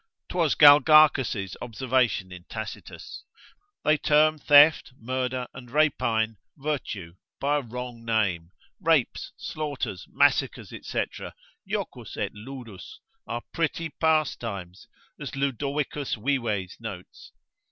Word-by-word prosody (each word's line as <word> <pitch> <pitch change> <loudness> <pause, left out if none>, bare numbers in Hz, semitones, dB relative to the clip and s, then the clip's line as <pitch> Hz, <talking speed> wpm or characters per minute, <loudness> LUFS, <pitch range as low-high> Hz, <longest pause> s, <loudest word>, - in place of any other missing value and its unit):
('Twas 170 -5 +1
Galgacus' 145 - +6
observation 120 -5 0
in 90 -1 -10
Tacitus) 110 -1 -8 0.6
they 155 0 +3
term 155 +1 +3
theft, 145 -1 +6
murder, 125 +1 -2
and 125 -1 -11
rapine, 115 -7 +1 0.2
virtue, 130 - -4 0.3
by 145 +1 +1
a - - -1
wrong 120 -1 -7
name, 100 -8 0 0.3
rapes, 160 -8 +1
slaughters, 145 - -4
massacres, - - +2
&c. - - -3 0.6
jocus - - -5
et - - -2
ludus, 115 -3 -10 0.3
are 120 +1 -4
pretty 165 0 -1
pastimes, 115 - -1 0.3
as - - -6
Ludovicus 140 +1 -2
Vives 110 -6 -2
notes. 100 -6 -9
130 Hz, 100 wpm, -26 LUFS, 110-150 Hz, 0.6 s, Galgacus